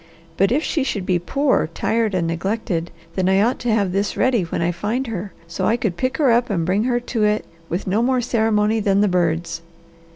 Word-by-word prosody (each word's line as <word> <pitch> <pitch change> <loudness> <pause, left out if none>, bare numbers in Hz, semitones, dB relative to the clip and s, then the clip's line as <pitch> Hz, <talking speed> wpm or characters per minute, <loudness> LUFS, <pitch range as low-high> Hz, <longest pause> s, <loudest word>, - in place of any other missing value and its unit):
But 195 +4 +2
if 295 +5 +2
she 300 - 0
should 205 -8 -2
be 180 -2 +1
poor, 270 - +1
tired, 220 -3 0
and 175 -2 +1
neglected, 175 0 -2 0.2
then 185 -1 +1
I 190 0 +4
ought 230 +5 +2
to 245 - -1
have 205 -4 +1
this 200 +2 -1
ready 255 -4 +3
when 170 - -3
I 170 +1 +1
find 210 +9 -2
her, 205 -4 -5 0.2
so 170 - -2
I 230 - +2
could 215 -7 -1
pick 255 +6 -1
her 280 -6 +4
up 240 +1 +2
and 170 -6 0
bring 195 +5 +1
her 245 -1 +1
to 235 -2 -2
it, 210 0 +1 0.2
with 175 +3 -2
no 200 +4 +1
more 255 +1 +2
ceremony 220 -2 +1
than 200 -1 +2
the 210 - +4
birds." 170 -2 0
210 Hz, 225 wpm, -21 LUFS, 180-235 Hz, 0.2 s, I